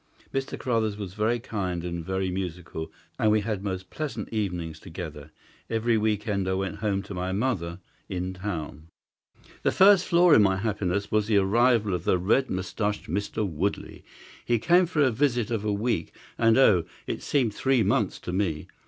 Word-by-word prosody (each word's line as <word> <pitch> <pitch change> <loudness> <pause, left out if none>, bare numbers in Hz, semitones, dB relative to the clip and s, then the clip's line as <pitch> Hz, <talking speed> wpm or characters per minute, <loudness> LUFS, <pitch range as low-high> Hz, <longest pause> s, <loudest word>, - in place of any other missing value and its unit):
Mr. 135 0 -2
Carruthers 110 -4 0
was 100 -4 -6
very 110 +3 +1
kind 95 -7 -3
and 85 -1 -4
very 95 +1 -2
musical, 90 -3 -5 0.3
and 110 - +3
we 105 0 +3
had 105 -2 -3
most 95 -2 -4
pleasant 135 -9 -4
evenings 90 -7 -3
together. 80 -5 -8 0.4
Every 115 +1 +1
week 105 0 0
end 100 -3 0
I 95 - +1
went 95 +1 -3
home 100 -2 -1
to 100 - -8
my 90 0 -3
mother 95 -6 -1 0.3
in 90 0 -3
town. 80 -6 -5 0.7
"The - - +2
first 190 -1 +6
flaw 175 0 +5
in 115 - +8
my 95 -2 +3
happiness 100 -2 -1
was 105 -1 +2
the 110 -2 +3
arrival 110 +1 +3
of 90 - -3
the - - +3
red 110 +9 +2
moustached 100 +3 -2
Mr. 100 +4 -1
Woodley. 90 +4 -3 0.4
He 120 - +2
came 175 +9 +4
for 155 -4 +2
a 130 - +3
visit 120 -2 0
of 110 -3 -1
a 105 - 0
week, 100 -4 -1 0.2
and 115 0 +4
oh, 100 -11 +5 0.2
it - - -4
seemed 125 -7 +1
three 130 0 +2
months 105 0 +1
to 90 - -5
me! 90 -6 -1
105 Hz, 180 wpm, -26 LUFS, 90-115 Hz, 0.7 s, in